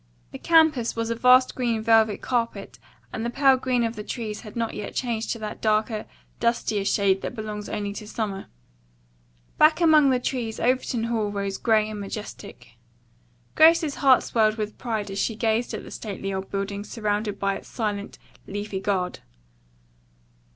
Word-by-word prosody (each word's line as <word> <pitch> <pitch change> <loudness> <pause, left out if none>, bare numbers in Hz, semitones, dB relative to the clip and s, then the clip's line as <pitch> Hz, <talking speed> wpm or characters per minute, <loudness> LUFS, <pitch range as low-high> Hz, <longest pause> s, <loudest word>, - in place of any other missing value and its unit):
The - - -8
campus 315 -8 +3
was 230 0 -2
a - - 0
vast 255 +2 +5
green 235 -3 -1
velvet 220 -2 +3
carpet 235 -2 -2 0.3
and 225 - -3
the 235 - -1
pale 270 +2 +4
green 255 -2 0
of 230 0 -2
the 210 - -6
trees 215 -2 -5
had 210 -3 -11
not 230 -1 -2
yet 210 - -6
changed 230 -3 -2
to - - -1
that 215 -1 -7
darker, 215 0 0 0.3
dustier 225 -3 0
shade 195 -1 +2
that - - -5
belongs 210 -2 -6
only 205 -1 -3
to 210 +1 -8
summer. 210 -3 -4 1.1
Back 310 +1 +6
among 310 -4 +5
the 255 -1 +2
trees 240 -3 -3
Overton 250 -1 0
Hall 225 -3 -1
rose 200 -1 -3
gray 220 -2 +3
and 215 -1 -6
majestic. 205 +1 -8 0.8
Grace's 315 -2 +5
heart 265 -2 +6
swelled 215 -2 +2
with 215 -1 -4
pride 220 -4 -3
as 195 - -4
she 225 - 0
gazed 225 +1 0
at - - -5
the - - -11
stately 195 -2 -5
old 190 0 -4
building 200 0 -3
surrounded 210 -1 -2
by 195 0 0
its - - -14
silent, 210 -3 -4 0.3
leafy 205 -1 -4
guard. 190 -2 -1
220 Hz, 170 wpm, -25 LUFS, 205-245 Hz, 1.1 s, Back